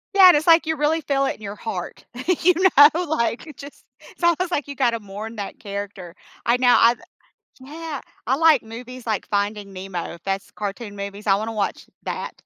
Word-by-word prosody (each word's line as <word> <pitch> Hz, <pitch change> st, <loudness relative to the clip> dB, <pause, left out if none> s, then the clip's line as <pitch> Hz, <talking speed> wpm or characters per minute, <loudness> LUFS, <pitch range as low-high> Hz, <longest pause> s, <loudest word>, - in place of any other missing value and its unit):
Yeah, 385 Hz, -2 st, +9 dB
and 350 Hz, -, +6 dB
it's 305 Hz, -, -3 dB
like 330 Hz, 0 st, +6 dB
you 320 Hz, 0 st, 0 dB
really 305 Hz, +2 st, +1 dB
feel 275 Hz, -2 st, 0 dB
it 270 Hz, -, -1 dB
in -, -, -21 dB
your 205 Hz, -1 st, -6 dB
heart. 190 Hz, -4 st, -6 dB, 0.4 s
You 360 Hz, +2 st, +6 dB, 0.2 s
know, 300 Hz, +5 st, +7 dB
like, 240 Hz, -7 st, -1 dB
you 310 Hz, -, -10 dB
just 280 Hz, +2 st, -12 dB, 0.2 s
it's -, -, -16 dB
almost 345 Hz, +1 st, +2 dB
like 290 Hz, -4 st, -1 dB
you 285 Hz, -, -7 dB
gotta 240 Hz, -4 st, +1 dB
mourn 210 Hz, +2 st, -8 dB
that 205 Hz, -2 st, -6 dB
character. 200 Hz, -3 st, -7 dB, 0.3 s
I 240 Hz, 0 st, +3 dB
now, 250 Hz, -1 st, +5 dB
I've 235 Hz, +1 st, +5 dB, 0.6 s
Yeah. 300 Hz, +2 st, -7 dB, 0.3 s
I 260 Hz, -, +2 dB
like 315 Hz, -4 st, +5 dB
movies 240 Hz, +2 st, -10 dB
like 215 Hz, -3 st, -2 dB
Finding 205 Hz, 0 st, -2 dB
Nemo, 185 Hz, -3 st, -6 dB
if 170 Hz, -, -15 dB
that's 195 Hz, +1 st, -3 dB
cartoon 205 Hz, +1 st, -6 dB
movies, 200 Hz, +1 st, -7 dB
I 195 Hz, -, +5 dB
wanna 215 Hz, +3 st, -2 dB
watch 210 Hz, -3 st, -3 dB, 0.2 s
that. -, -, -4 dB
235 Hz, 200 wpm, -22 LUFS, 200-295 Hz, 0.6 s, Yeah